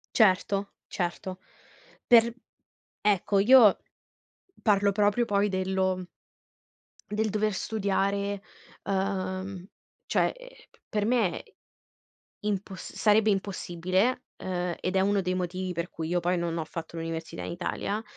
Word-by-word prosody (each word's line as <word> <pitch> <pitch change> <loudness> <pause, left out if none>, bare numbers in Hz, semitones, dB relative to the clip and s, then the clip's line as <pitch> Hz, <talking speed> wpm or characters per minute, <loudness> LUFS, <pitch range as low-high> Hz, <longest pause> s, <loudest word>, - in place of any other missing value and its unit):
Certo, 200 -1 +3 0.2
certo, 185 +1 -3 0.7
per 235 -1 +7 0.7
ecco, 200 -1 +2
io 225 -1 +7 0.8
parlo 200 -2 +3
proprio, 210 +3 +2
poi, 205 -1 +2
dello 190 -1 0 1.0
del 215 +1 0
dover 215 +1 +1
studiare, 200 -1 -1 0.4
ehm, 190 -1 -2 0.4
cioè, - - +2
e - - -15
p - - -28
per 210 -1 0
me 220 -6 +1
è - - -25 0.9
imposs 200 -2 -4
sarebbe 215 0 +4
impossibile, 190 +4 0
eh, 180 -2 -2
ed 185 +1 -1
è - - +4
1 200 +1 +2
dei 185 0 -1
motivi 185 0 -2
per 170 +1 -3
cui 160 -1 -5
io, 175 0 +1
poi, 180 +1 +1
non 170 -1 -2
ho 160 - -2
fatto 165 +1 -7
l'università 165 0 -5
in - - -4
Italia, 200 +4 -3
195 Hz, 125 wpm, -28 LUFS, 180-210 Hz, 1.0 s, per